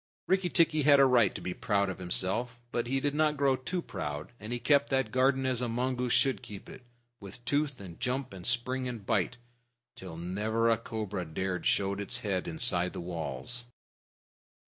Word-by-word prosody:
Rikki 190 Hz, -1 st, +2 dB
tikki 160 Hz, -2 st, +3 dB
had 145 Hz, 0 st, +6 dB
a 135 Hz, -, +8 dB
right 120 Hz, -6 st, +4 dB
to -, -, -5 dB
be 90 Hz, -, -3 dB
proud 100 Hz, +1 st, +1 dB
of 95 Hz, 0 st, -5 dB
himself. 95 Hz, +7 st, 0 dB, 0.2 s
But 120 Hz, 0 st, -1 dB
he 135 Hz, +2 st, +1 dB
did 145 Hz, +1 st, 0 dB
not 150 Hz, 0 st, +2 dB
grow 140 Hz, -1 st, +3 dB
too 170 Hz, +7 st, -3 dB
proud, 75 Hz, -6 st, -5 dB
and 105 Hz, +2 st, -7 dB
he 120 Hz, -, 0 dB
kept 140 Hz, +3 st, +3 dB
that 130 Hz, -5 st, +1 dB
garden 130 Hz, +1 st, +3 dB
as 130 Hz, -2 st, 0 dB
a 125 Hz, -, -1 dB
mongoose 125 Hz, +1 st, -1 dB
should 135 Hz, -1 st, +3 dB
keep 100 Hz, -2 st, -10 dB
it, -, -, -11 dB, 0.4 s
with 105 Hz, +5 st, -11 dB
tooth 145 Hz, -3 st, 0 dB
and 90 Hz, -4 st, -10 dB
jump 130 Hz, -2 st, -1 dB
and 95 Hz, -2 st, -9 dB
spring 125 Hz, +3 st, 0 dB
and 115 Hz, -5 st, -6 dB
bite, 120 Hz, -, 0 dB, 0.6 s
till 90 Hz, -4 st, -8 dB
never 110 Hz, +7 st, 0 dB
a 115 Hz, -, +3 dB
cobra 105 Hz, -5 st, -4 dB
dared 90 Hz, +3 st, -2 dB
show 100 Hz, 0 st, +2 dB
its 100 Hz, 0 st, -2 dB
head 95 Hz, -4 st, -1 dB
inside 85 Hz, +2 st, +1 dB
the -, -, -5 dB
walls. 90 Hz, +8 st, -4 dB
120 Hz, 190 wpm, -30 LUFS, 95-130 Hz, 0.6 s, a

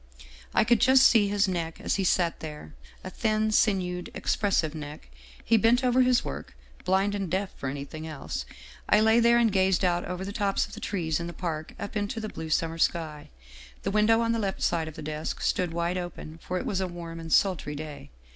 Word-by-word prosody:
I -, -, +4 dB
could 240 Hz, 0 st, +3 dB
just 260 Hz, 0 st, +6 dB
see 215 Hz, -3 st, +5 dB
his 205 Hz, 0 st, +2 dB
neck 170 Hz, -3 st, -3 dB
as -, -, -1 dB
he 195 Hz, -, 0 dB
sat 175 Hz, -2 st, +1 dB
there, 150 Hz, -, -8 dB, 0.3 s
a 185 Hz, -, -6 dB
thin 215 Hz, +1 st, 0 dB
sinewed, 180 Hz, -4 st, +1 dB
expressive 180 Hz, -7 st, 0 dB
neck. 150 Hz, -, -8 dB, 0.4 s
He 230 Hz, -, +4 dB
bent 230 Hz, +4 st, +3 dB
over 250 Hz, 0 st, +4 dB
his 250 Hz, -1 st, +3 dB
work, 70 Hz, -1 st, -6 dB, 0.3 s
blind 195 Hz, +2 st, +2 dB
and 195 Hz, -3 st, -3 dB
deaf 190 Hz, +3 st, -1 dB
for 140 Hz, -, -4 dB
anything 145 Hz, +3 st, -6 dB
else. 155 Hz, -3 st, -5 dB, 0.4 s
I 210 Hz, -, +6 dB
lay 220 Hz, +2 st, +5 dB
there 235 Hz, 0 st, +5 dB
and 235 Hz, -2 st, +3 dB
gazed 190 Hz, -1 st, +2 dB
out 175 Hz, -1 st, +1 dB
over 180 Hz, +1 st, -4 dB
the 200 Hz, -, -5 dB
tops 200 Hz, -3 st, 0 dB
of -, -, -14 dB
the -, -, -7 dB
trees 165 Hz, -6 st, -2 dB
in 170 Hz, -, -4 dB
the 175 Hz, -, -6 dB
park 160 Hz, -4 st, -5 dB
up 200 Hz, +2 st, -6 dB
into 205 Hz, +2 st, -2 dB
the 215 Hz, -1 st, -4 dB
blue 160 Hz, -4 st, -7 dB
summer 165 Hz, +1 st, 0 dB
sky. 155 Hz, -3 st, -1 dB, 0.5 s
The -, -, -1 dB
window 215 Hz, +2 st, +4 dB
on 230 Hz, 0 st, +1 dB
the 230 Hz, -, 0 dB
left 195 Hz, -3 st, -2 dB
side 165 Hz, -2 st, +1 dB
of 160 Hz, -, -8 dB
the -, -, -8 dB
desk 155 Hz, +1 st, -4 dB
stood 180 Hz, -2 st, 0 dB
wide 170 Hz, +2 st, -1 dB
open, 165 Hz, -2 st, -7 dB
for 185 Hz, -, -3 dB
it -, -, -3 dB
was 190 Hz, -1 st, -1 dB
a 190 Hz, -, 0 dB
warm 170 Hz, -1 st, -7 dB
and 165 Hz, -1 st, -8 dB
sultry 175 Hz, -6 st, +2 dB
day. 150 Hz, -, -8 dB
185 Hz, 220 wpm, -27 LUFS, 160-210 Hz, 0.5 s, just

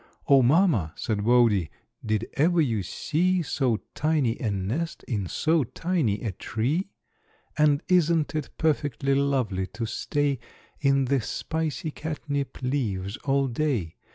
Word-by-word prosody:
"O, 135 Hz, -1 st, +7 dB
Mamma," 130 Hz, -, +3 dB
said 105 Hz, -3 st, -2 dB
Wodie, 115 Hz, -8 st, +4 dB, 0.3 s
"did 110 Hz, +1 st, -1 dB
ever 170 Hz, +4 st, +3 dB
you 115 Hz, -9 st, +2 dB
see 175 Hz, -, 0 dB
So 130 Hz, -6 st, 0 dB
tiny 150 Hz, -7 st, +1 dB
a 115 Hz, -, -1 dB
nest 105 Hz, -, -3 dB
in 105 Hz, -7 st, -2 dB
so 155 Hz, -, +1 dB
tiny 135 Hz, -, -1 dB
a 110 Hz, -, -1 dB
tree? 135 Hz, -, -2 dB, 0.7 s
And 150 Hz, -2 st, +3 dB
isn't 170 Hz, -4 st, +3 dB
it 155 Hz, -2 st, -3 dB
perfectly 145 Hz, -3 st, 0 dB
lovely 130 Hz, -9 st, 0 dB
to 115 Hz, +2 st, -5 dB
stay 140 Hz, +4 st, -1 dB, 0.4 s
In 140 Hz, -1 st, +3 dB
the 135 Hz, 0 st, +1 dB
spicy 160 Hz, +6 st, -3 dB
catnip 145 Hz, -3 st, -4 dB
leaves 110 Hz, -7 st, -1 dB
all 135 Hz, 0 st, +2 dB
day? 120 Hz, -, -1 dB
135 Hz, 130 wpm, -26 LUFS, 110-155 Hz, 0.7 s, O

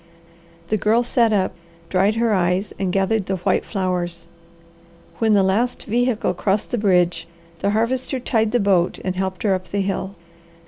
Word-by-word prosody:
The 215 Hz, -, +2 dB
Girl 225 Hz, +4 st, +3 dB
sat 235 Hz, -2 st, +2 dB
up, 195 Hz, -3 st, +1 dB, 0.3 s
dried 195 Hz, +4 st, +2 dB
her 230 Hz, -1 st, +1 dB
eyes 185 Hz, +1 st, 0 dB
and 190 Hz, -2 st, 0 dB
gathered 195 Hz, +2 st, 0 dB
the 190 Hz, -, 0 dB
white 180 Hz, -, 0 dB
flowers. 180 Hz, -4 st, -3 dB, 0.9 s
When 220 Hz, -2 st, +3 dB
the 195 Hz, -, +4 dB
last 220 Hz, +6 st, 0 dB
vehicle 240 Hz, +1 st, 0 dB
crossed 200 Hz, +1 st, -1 dB
the 240 Hz, -, 0 dB
bridge, 180 Hz, -4 st, +2 dB, 0.3 s
the 200 Hz, -, 0 dB
Harvester 250 Hz, +5 st, 0 dB
tied 225 Hz, -3 st, 0 dB
the 245 Hz, -, +2 dB
boat 190 Hz, -4 st, +2 dB
and 185 Hz, -1 st, -1 dB
helped 190 Hz, -1 st, -3 dB
her 205 Hz, -3 st, +3 dB
up 185 Hz, -1 st, -4 dB
the 200 Hz, -, -1 dB
hill. 195 Hz, 0 st, -3 dB
200 Hz, 170 wpm, -21 LUFS, 185-225 Hz, 0.9 s, the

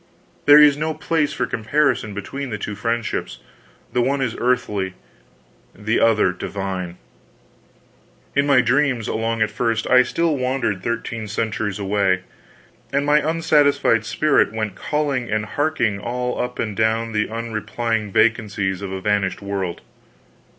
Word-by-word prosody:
There 145 Hz, 0 st, +10 dB
is 150 Hz, -1 st, +7 dB
no 155 Hz, +1 st, -2 dB
place 155 Hz, -3 st, 0 dB
for 145 Hz, -, -1 dB
comparison 115 Hz, -2 st, 0 dB
between 135 Hz, +7 st, -5 dB
the 105 Hz, -, -3 dB
two 105 Hz, -, -5 dB
friendships; 115 Hz, +2 st, -2 dB, 0.6 s
the 125 Hz, -, +2 dB
one 140 Hz, +3 st, +1 dB
is 130 Hz, -4 st, -1 dB
earthly, 105 Hz, -6 st, 0 dB, 0.8 s
the 110 Hz, +3 st, 0 dB
other 110 Hz, -5 st, +3 dB
divine. 95 Hz, -1 st, -5 dB, 1.4 s
In 140 Hz, 0 st, +2 dB
my 140 Hz, -3 st, +5 dB
dreams, 130 Hz, -2 st, +1 dB
along 115 Hz, 0 st, 0 dB
at 110 Hz, -, -2 dB
first, 115 Hz, -2 st, -1 dB
I 125 Hz, 0 st, +6 dB
still 165 Hz, +5 st, 0 dB
wandered 130 Hz, -7 st, -1 dB
thirteen 115 Hz, 0 st, -3 dB
centuries 105 Hz, -1 st, -2 dB
away, 100 Hz, -2 st, +1 dB, 0.7 s
and 140 Hz, +1 st, +1 dB
my 150 Hz, +1 st, +4 dB
unsatisfied 150 Hz, -7 st, +3 dB
spirit 140 Hz, +6 st, +2 dB
went 110 Hz, -2 st, -3 dB
calling 140 Hz, -1 st, -2 dB
and 110 Hz, 0 st, -1 dB
harking 120 Hz, -5 st, 0 dB
all 125 Hz, +3 st, -2 dB
up 125 Hz, 0 st, -4 dB
and 105 Hz, -3 st, -3 dB
down 110 Hz, +1 st, +1 dB
the 105 Hz, -1 st, 0 dB
unreplying 115 Hz, -1 st, -3 dB
vacancies 105 Hz, -4 st, +1 dB
of 100 Hz, -1 st, -5 dB
a 95 Hz, 0 st, -4 dB
vanished 100 Hz, -1 st, 0 dB
world. 95 Hz, -3 st, -3 dB
115 Hz, 140 wpm, -21 LUFS, 105-135 Hz, 1.4 s, There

